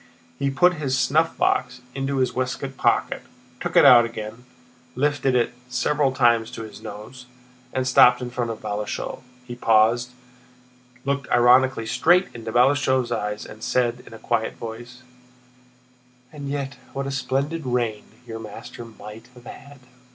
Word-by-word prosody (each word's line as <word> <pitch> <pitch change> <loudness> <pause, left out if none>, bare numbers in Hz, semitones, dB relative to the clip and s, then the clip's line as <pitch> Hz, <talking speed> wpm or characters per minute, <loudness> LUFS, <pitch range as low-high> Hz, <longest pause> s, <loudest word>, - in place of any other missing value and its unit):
He 140 - 0
put 180 +6 +4
his 130 -2 0
snuffbox 135 -3 +1
into 135 0 -2
his 130 -2 +1
waistcoat 130 +1 -3
pocket, - - +1 0.4
took - - -4
it - - +7
out 120 -2 +9
again, 115 +1 -7 0.5
lifted 140 -1 +1
it 120 0 +1 0.2
several 135 +3 +1
times 120 -3 +2
to 115 - -6
his 110 0 -11
nose, 110 +4 -10 0.4
and 130 -1 -1
stopped 125 -1 +6
in 125 -1 -6
front 120 -1 -2
of 115 - -6
Balashëv. 105 +4 -4 0.2
He 120 - -7
paused, 115 +1 +3 1.0
looked 140 -1 -2
ironically 125 0 +4
straight 180 +10 +3
into 115 -1 -7
Balashëv's 130 0 +2
eyes, 105 -2 -3
and 110 - -12
said 125 -1 0
in - - -12
a - - -9
quiet 110 0 -2
voice: 120 +3 -9 1.3
"And 145 -2 -7
yet 140 -3 -4 0.2
what 135 0 -3
a 135 - -3
splendid 140 +4 -2
reign 120 -4 -1 0.2
your 115 -1 -7
master 115 +2 -9
might 110 0 -12
have 120 -1 -16
had!" 140 +2 -12
125 Hz, 150 wpm, -23 LUFS, 115-135 Hz, 1.3 s, out